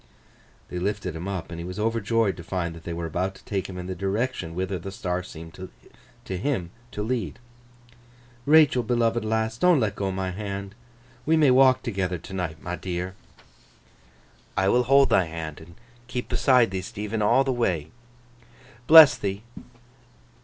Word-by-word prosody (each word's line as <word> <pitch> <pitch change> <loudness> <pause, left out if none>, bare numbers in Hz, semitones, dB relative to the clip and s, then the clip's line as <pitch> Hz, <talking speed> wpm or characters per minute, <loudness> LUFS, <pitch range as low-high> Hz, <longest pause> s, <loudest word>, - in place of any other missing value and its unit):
They 90 - -4
lifted 100 -2 -2
him 85 +4 -5
up, 95 -4 -4
and 85 - -6
he - - -5
was 90 +1 -7
overjoyed 115 -1 +1
to 85 - -8
find 85 -1 -3
that 85 -1 -13
they 85 - -4
were 85 0 -4
about 90 +4 -2
to - - -17
take 100 -2 -3
him 90 - -7
in 90 - -6
the 95 - -4
direction 95 -2 -2
whither 95 0 -2
the 95 +4 -7
star 90 -1 -3
seemed 80 -2 -11 0.7
to 95 - -4
him 95 -6 -2 0.2
to 105 - -4
lead. 120 +1 -2 1.1
'Rachael, 150 -4 +6
beloved 120 -1 0
lass! 110 +1 -1
Don't 180 -2 +5
let 105 -4 0
go 100 -1 -2
my 95 0 -3
hand. 100 0 -5 0.5
We 160 +4 +3
may 150 -4 +5
walk 130 0 +5
toogether 95 -5 -2
t'night, 85 -3 -5
my 90 0 -3
dear!' 90 0 -4 1.4
'I 95 0 +3
will 125 +3 +3
hold 135 +2 +5
thy 95 - +4
hand, 80 -2 -6
and 85 +2 -14 0.3
keep 125 0 -4
beside 125 -6 +3
thee, 95 -1 -2
Stephen, 105 +2 -4
all 120 +6 +4
the 135 -1 0
way.' 90 -11 -1 1.0
'Bless 160 -3 +10
thee! 100 +1 -4
100 Hz, 170 wpm, -25 LUFS, 90-115 Hz, 1.4 s, Bless